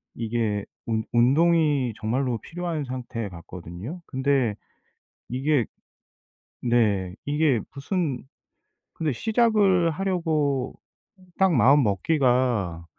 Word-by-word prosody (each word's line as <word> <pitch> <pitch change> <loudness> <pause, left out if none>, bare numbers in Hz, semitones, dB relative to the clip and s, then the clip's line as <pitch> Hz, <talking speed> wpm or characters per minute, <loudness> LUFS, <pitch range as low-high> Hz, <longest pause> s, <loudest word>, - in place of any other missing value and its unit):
이게 110 -3 -1 0.2
운 110 -1 -1
운동이 145 0 +3
정말로 120 +2 -1
필요한 170 -3 -4
상태 125 -4 -5
같거든요. 90 - -9
근데 130 -5 +1 0.7
이게 130 0 +1 1.0
네 105 -6 +1
이게 145 -4 +2
무슨 140 -2 -2 0.7
근데 155 -5 -1
시작을 210 - +3
하려고 155 -7 0 0.7
딱 190 -3 +4
마음먹기가 125 - +2
130 Hz, 190 characters per minute, -25 LUFS, 115-160 Hz, 1.0 s, 딱